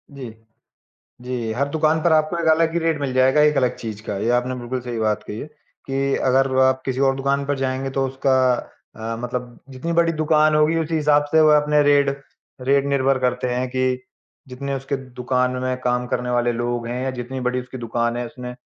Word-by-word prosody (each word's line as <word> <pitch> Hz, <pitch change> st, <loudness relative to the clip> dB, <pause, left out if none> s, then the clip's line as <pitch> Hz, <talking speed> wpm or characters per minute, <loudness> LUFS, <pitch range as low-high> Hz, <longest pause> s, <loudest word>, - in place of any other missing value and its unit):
जी। 130 Hz, -4 st, -7 dB, 0.9 s
जी, 125 Hz, -3 st, -3 dB
हर 140 Hz, +5 st, -1 dB
दुकान 155 Hz, +1 st, +1 dB
पर 170 Hz, -, +4 dB
आपको 155 Hz, +2 st, +2 dB
एक 170 Hz, -, -2 dB
अलग 160 Hz, +1 st, +3 dB
ही 170 Hz, -, 0 dB
रेट 165 Hz, -3 st, 0 dB
मिल 140 Hz, -2 st, -2 dB
जाएगा 130 Hz, +3 st, +4 dB
एक 150 Hz, -, -1 dB
अलग 130 Hz, -2 st, +2 dB
चीज़ 110 Hz, -2 st, -7 dB
का, 100 Hz, -, -3 dB
ये 110 Hz, +4 st, 0 dB
आपने 125 Hz, +1 st, -3 dB
बिल्कुल 125 Hz, +2 st, -4 dB
सही 120 Hz, -2 st, -3 dB
बात 110 Hz, -1 st, 0 dB
कही 105 Hz, -, -6 dB
है, -, -, -6 dB, 0.4 s
कि 135 Hz, 0 st, 0 dB
अगर 135 Hz, 0 st, +2 dB
आप 130 Hz, 0 st, +3 dB
किसी 130 Hz, 0 st, -2 dB
और -, -, -2 dB
दुकान 140 Hz, +1 st, 0 dB
पर 145 Hz, 0 st, 0 dB
जाएँगे 135 Hz, 0 st, -2 dB
तो 135 Hz, 0 st, 0 dB
उसका 135 Hz, 0 st, 0 dB, 0.6 s
अ, 115 Hz, +1 st, -4 dB
मतलब 125 Hz, 0 st, -5 dB
जितनी 135 Hz, +6 st, -4 dB
बड़ी 170 Hz, 0 st, +3 dB
दुकान 155 Hz, -1 st, +3 dB
होगी 155 Hz, +2 st, +3 dB
उसी 165 Hz, 0 st, -2 dB
हिसाब 150 Hz, -1 st, +3 dB
से 160 Hz, -, +5 dB
वह 155 Hz, -1 st, +6 dB
अपने 150 Hz, 0 st, +3 dB
रेट 145 Hz, -1 st, +4 dB, 0.6 s
रेट 140 Hz, 0 st, +4 dB
निर्भर 135 Hz, -1 st, +2 dB
करते 125 Hz, 0 st, -1 dB
हैं 125 Hz, +1 st, -1 dB
कि 130 Hz, +1 st, -1 dB, 0.6 s
जितने 140 Hz, +2 st, -4 dB
उसके 135 Hz, +1 st, -3 dB, 0.2 s
दुकान 125 Hz, 0 st, +1 dB
में 130 Hz, 0 st, -1 dB
काम 125 Hz, 0 st, 0 dB
करने 125 Hz, 0 st, -2 dB
वाले 120 Hz, 0 st, +1 dB
लोग 120 Hz, 0 st, -2 dB
हैं 125 Hz, +2 st, -3 dB
या 130 Hz, -, -1 dB
जितनी 130 Hz, +1 st, -6 dB
बड़ी 125 Hz, 0 st, -1 dB
उसकी 125 Hz, +1 st, -9 dB
दुकान 120 Hz, 0 st, -1 dB
है, 120 Hz, 0 st, -3 dB
उसने 125 Hz, -1 st, -8 dB
130 Hz, 210 wpm, -21 LUFS, 125-145 Hz, 0.9 s, वह